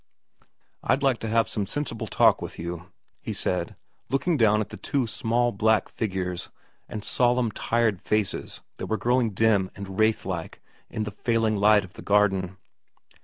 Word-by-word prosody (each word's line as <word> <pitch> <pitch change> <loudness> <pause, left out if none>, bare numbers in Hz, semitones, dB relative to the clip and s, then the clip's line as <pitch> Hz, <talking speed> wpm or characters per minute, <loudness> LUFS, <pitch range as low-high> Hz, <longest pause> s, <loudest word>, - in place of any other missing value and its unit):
' - - -46 0.3
I'd 140 - +1
like 135 -3 +2
to 115 - -4
have 115 +1 +3
some 100 -3 -3
sensible 145 -4 -3
talk - - +4
with - - -6
you/ 85 0 -6 0.3
he - - -4
said, - - -2 0.3
looking 135 +7 +1
down 110 -5 +4
at 105 - -2
the 105 - -8
two 130 +6 -1
small 120 +2 0
black 110 +1 +2
figures 95 -4 -3 0.4
and 105 -1 -5
solemn 125 -2 +2
tired 110 -2 0
faces 105 -2 -2 0.2
that - - -5
were 110 - 0
growing 120 +2 +2
dim 100 -2 +2
and 100 0 -7
wraith 110 0 +2
like 90 -4 -5 0.3
in 110 - -3
the 105 - -4
failing 115 0 0
light 105 0 +5
of 90 - -17
the - - -10
garden. 95 -2 +2
110 Hz, 170 wpm, -26 LUFS, 100-115 Hz, 0.4 s, light